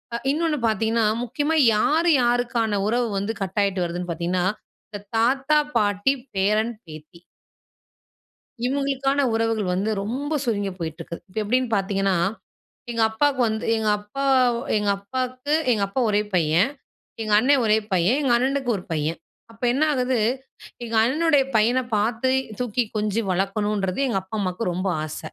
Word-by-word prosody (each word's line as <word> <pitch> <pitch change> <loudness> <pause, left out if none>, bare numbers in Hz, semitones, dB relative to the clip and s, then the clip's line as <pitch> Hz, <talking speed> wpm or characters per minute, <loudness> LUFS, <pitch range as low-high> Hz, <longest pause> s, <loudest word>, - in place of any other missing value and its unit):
அ, - - 0
இன்னொன்னு 310 -1 0
பாத்தீங்கன்னா, 225 +1 +1 0.2
முக்கியமா 290 +6 -1 0.2
யார் 320 +10 +2
யாருக்கான 240 -4 +1
உறவு 240 +1 +1
வந்து, 200 +3 -2
கட்டாயிட்டு 195 -1 0
வருதுன்னு 175 +1 -4
பாத்தீங்கன்னா, 175 +2 -1 0.4
இந்த 205 -2 -7 0.2
தாத்தா, 265 +6 +2 0.2
பாட்டி. 205 +5 +2 0.2
பேரன், 215 +4 +1
பேத்தி. 155 +1 -12 1.5
இவங்களுக்கான 275 +1 0
உறவுகள் 225 -4 0
வந்து 200 +4 -1
ரொம்ப 265 +9 -3
சுருங்கி 205 -5 -1
போயிட்டிருக்கு. 165 0 -6
இப்ப 185 - -6
எப்டின்னு 250 +3 0
பார்த்தீங்கன்னா, 195 -1 0 0.7
எங்க 230 -1 0
அப்பாவுக்கு 270 +3 +1
வந்து 220 0 -3
எங்க 220 -1 -1
அப்பா 210 +7 -5 0.5
எங்க 210 -1 0
அப்பாக்கு 255 +6 -3 0.2
எங்க 210 -3 0
அப்பா 230 +7 -2
1 205 0 +2
பையன். 170 - +3 0.5
எங்க 215 -1 -2
அண்ணே 275 +6 +4
1 215 0 +4
பையன். 185 +7 +3
எங்க 265 -4 +2
அண்ணனுக்கு 265 +1 0
1 180 - -8
பையன். 155 +1 -1 0.3
அப்போ 230 +2 -7
என்ன 270 +5 0
ஆகுது, 255 -2 0 0.7
எங்க 230 - -6
அண்ணனுடைய 290 +3 +3
பையன 230 +4 +3 0.2
பார்த்து, 225 +5 0 0.3
தூக்கி 245 0 0
கொஞ்சு 210 +1 0
வளர்க்கணுன்றது, 195 +2 -1
எங்க 230 - 0
அப்பா 190 +4 -7
அம்மாவுக்கு 185 +1 -2
ரொம்ப 185 +3 -2 0.2
ஆச. 155 0 -6
220 Hz, 140 wpm, -23 LUFS, 195-255 Hz, 1.5 s, அண்ணே